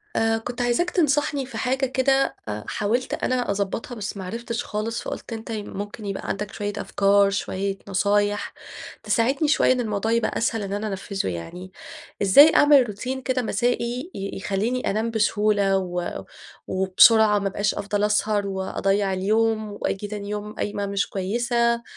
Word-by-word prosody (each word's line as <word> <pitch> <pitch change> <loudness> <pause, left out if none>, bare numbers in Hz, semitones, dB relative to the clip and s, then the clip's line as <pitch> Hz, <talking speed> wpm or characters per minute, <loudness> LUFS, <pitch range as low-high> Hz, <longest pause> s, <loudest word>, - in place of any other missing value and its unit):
آآ، 225 0 +2
كنت 245 +2 -5
عايزاك 245 +9 +1
تنصحني 295 -5 +1
في 270 - -8
حاجة 265 +1 0
كده 270 +1 +1 0.3
حاولت 235 +5 -1
أنا 250 -4 0
أضبطها 205 +6 -3
بس 200 -2 -5
ما 190 - -6
عرفتش 230 +4 -4
خالص. 220 +2 -3
فقلت - - -6
أنت 225 +1 -7
ممكن 205 0 -6
يبقى 195 -1 -4
عندك 200 0 -3
شوية 205 0 -3
أفكار، 200 0 +3
شوية 195 0 -2
نصايح 205 +1 +1 0.5
تساعدني 245 +8 +1
شوية 295 - +4
إن 255 - +2
الموضوع 220 -2 -1
يبقى 230 -1 +1
أسهل 225 -1 0
إن 195 0 -4
أنا 205 +2 -2
أنفذُه 195 0 -3
يعني. 135 - -7 0.5
إزاي 245 +11 +7
أعمل 290 -4 +6
روتين 255 +6 -4
كده 255 0 0
مسائي 245 - -1
ي 195 0 -4
يخليني 205 +7 -1
أنام 220 +3 -1
بسهولة 210 -2 +2
و 180 -2 -3 0.4
وبسرعة 205 +3 +5
ما 200 - -1
ابقاش 200 +1 0
افضل 205 0 -2
اسهر 210 -1 +1
واضيع 195 +1 0
اليوم، 215 +3 +1
وآجي 205 0 -3
تاني 205 -1 -6
يوم 210 0 -5
قايمة 205 -1 -3
مش 200 0 -1
كويسة 235 +4 0
210 Hz, 155 wpm, -24 LUFS, 200-240 Hz, 0.5 s, إزاي